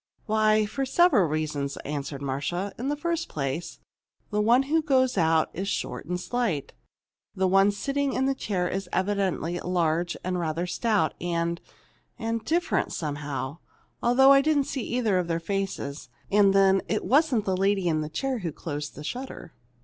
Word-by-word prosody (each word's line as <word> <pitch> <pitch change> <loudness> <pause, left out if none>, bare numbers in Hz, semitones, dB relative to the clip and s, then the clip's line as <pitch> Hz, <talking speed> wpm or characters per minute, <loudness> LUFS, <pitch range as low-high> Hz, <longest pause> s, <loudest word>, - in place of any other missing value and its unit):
"Why, 215 -1 +3
for 270 +7 -3
several 265 - +4
reasons," 150 -2 -2
answered 140 -1 -4
Marcia. 150 +9 -2
"In 260 +3 -2
the 295 - 0
first 335 +2 -2
place, 140 +3 -3 0.5
the 210 0 +1
one 240 +5 +4
who 315 +4 +1
goes 260 -4 +2
out 160 -3 +2
is 190 +3 -4
short 175 - -3
and 180 +1 -2
slight. 215 - -2 0.6
The 190 -1 +2
one 195 +2 +5
sitting 275 +7 -1
in 265 - +1
the 270 - +2
chair 190 -8 -2
was 195 -1 -4
evidently 190 -3 0
large, 175 -1 0
and 180 0 -1
rather 165 +1 -1
stout, 205 -2 +1
and 170 0 -1 0.6
and 225 0 -2
different, 340 +7 0
somehow, 145 -1 -4 0.4
although 265 +3 +6
I 275 0 +7
didn't 295 -1 +2
see 265 0 -4
either 225 -5 0
of 180 - -2
their 165 -1 0
faces. 170 -7 -4 0.2
And 200 -1 +5
then, 195 0 +4
it 215 - -1
wasn't 275 -6 +3
the 190 - +1
lady 195 -1 +1
in 155 -2 +1
the 155 - -4
chair 260 +10 -2
who 175 -5 -3
closed 145 -1 -6
the 150 - -8
shutter. 250 - -6
195 Hz, 170 wpm, -26 LUFS, 165-245 Hz, 0.6 s, I